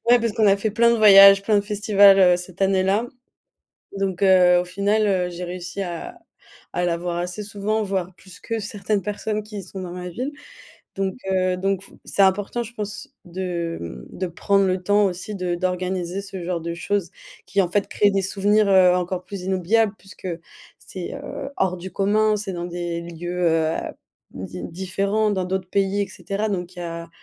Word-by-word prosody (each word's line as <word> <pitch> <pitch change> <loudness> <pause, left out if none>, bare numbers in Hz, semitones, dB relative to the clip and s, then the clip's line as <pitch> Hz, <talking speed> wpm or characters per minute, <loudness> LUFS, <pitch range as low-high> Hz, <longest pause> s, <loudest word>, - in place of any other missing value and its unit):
Ouais, 245 - +7
parce 230 -1 -1
qu'on 215 0 +2
a 195 0 +5
fait 215 +2 -1
plein 235 +3 +4
de 235 - +3
voyages, 195 -2 +9
plein 210 0 +2
de - - +4
festivals, 205 -2 +5
heu, 180 -2 +6
cette 180 +1 -7
année-là, 195 +4 +2 0.9
donc, 195 -1 -2
heu, 180 -2 +6
au 180 - -2
final, 200 +4 +1
heu, 185 -3 +1
j'ai 175 +1 -6
réussi 180 +2 -6
à 195 - -6 0.5
à 180 - 0
la 170 -1 0
voir 175 0 -3
assez 180 +4 -4
souvent, 210 +2 -2
voire 190 -2 -3
plus 185 0 -13
que 225 -1 -3
certaines 205 0 -2
personnes 210 +2 -3
qui 210 -2 -7
sont 190 +1 -8
dans 175 -1 -6
ma 180 0 -6
ville, 255 - -4 0.7
donc, 195 -1 -1 0.2
heu, 185 -1 +1
donc 195 0 -1
f - - -15
c'est 200 - +1
important, 205 +5 +2
je 235 +2 -11
pense, 210 -1 -6 0.2
de, 175 -2 -4
mmh, 65 - -9
de 185 - -1
prendre 195 +3 +1
le 185 0 -1
temps 205 +2 +3
aussi 190 +3 -5
de 180 -2 -2
d'organiser 185 0 -2
ce 195 -2 -7
genre 175 -1 -2
de 170 +1 -4
choses, 195 +1 -2 0.4
qui 195 +2 +2
en 175 - -2
fait 205 0 0
créent 205 -1 +3
des 195 -1 +1
souvenirs, 205 +2 +2
heu, 185 -2 +6
encore 180 0 -3
plus 200 -3 -7
inoubliables 190 +3 +1
puisque 195 -1 -10 0.5
c'est, - - -7
heu, 270 - -6
hors 185 -1 0
du 185 0 -8
commun, 215 +2 +2
c'est 200 -2 -5
dans 175 0 -4
des 170 -1 -4
lieux, 175 +1 -5
heu, 160 -1 +2
à - - -5 0.4
di 90 -1 -7
différents, 195 - -1
dans 190 -2 -1
d'autres 185 0 -3
pays 200 0 +1
et - - -4
cetera, 205 +2 -3
donc 180 -2 -4
il 175 - -7
y - - -4
a, 170 0 -6
190 Hz, 200 wpm, -22 LUFS, 180-205 Hz, 0.9 s, voyages